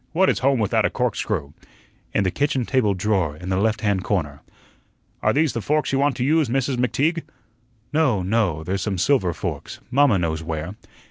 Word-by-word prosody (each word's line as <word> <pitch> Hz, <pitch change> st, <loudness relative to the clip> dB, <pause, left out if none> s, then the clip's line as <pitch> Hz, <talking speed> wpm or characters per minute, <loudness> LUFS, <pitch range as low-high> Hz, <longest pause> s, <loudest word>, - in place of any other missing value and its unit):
What 190 Hz, +3 st, +4 dB
is -, -, -2 dB
home 135 Hz, +1 st, +2 dB
without 110 Hz, 0 st, +1 dB
a -, -, +2 dB
corkscrew?" 105 Hz, -, -2 dB, 0.6 s
"In 105 Hz, -, +1 dB
the 95 Hz, -, 0 dB
kitchen 140 Hz, -, 0 dB
table 110 Hz, -7 st, +1 dB
drawer, 95 Hz, -6 st, 0 dB
in 90 Hz, +3 st, -7 dB
the 95 Hz, -, +1 dB
left 105 Hz, +1 st, +1 dB
hand 100 Hz, -3 st, 0 dB
corner." 75 Hz, -9 st, -2 dB, 0.8 s
"Are -, -, +3 dB
these 155 Hz, 0 st, +2 dB
the 115 Hz, -, -2 dB
forks 150 Hz, +6 st, 0 dB
you 135 Hz, -, +2 dB
want 140 Hz, 0 st, +2 dB
to 125 Hz, -, -1 dB
use, 150 Hz, -1 st, +2 dB
Mrs. 135 Hz, +1 st, 0 dB
McTeague?" 150 Hz, +7 st, +1 dB, 0.7 s
"No, 130 Hz, -, +2 dB
no, 95 Hz, -6 st, 0 dB
there's 95 Hz, +3 st, -2 dB
some 95 Hz, 0 st, -2 dB
silver 95 Hz, -3 st, +2 dB
forks. -, -, -5 dB
Mamma 135 Hz, -5 st, +4 dB
knows 80 Hz, -2 st, -1 dB
where." 80 Hz, +2 st, -4 dB
110 Hz, 190 wpm, -22 LUFS, 90-135 Hz, 0.8 s, What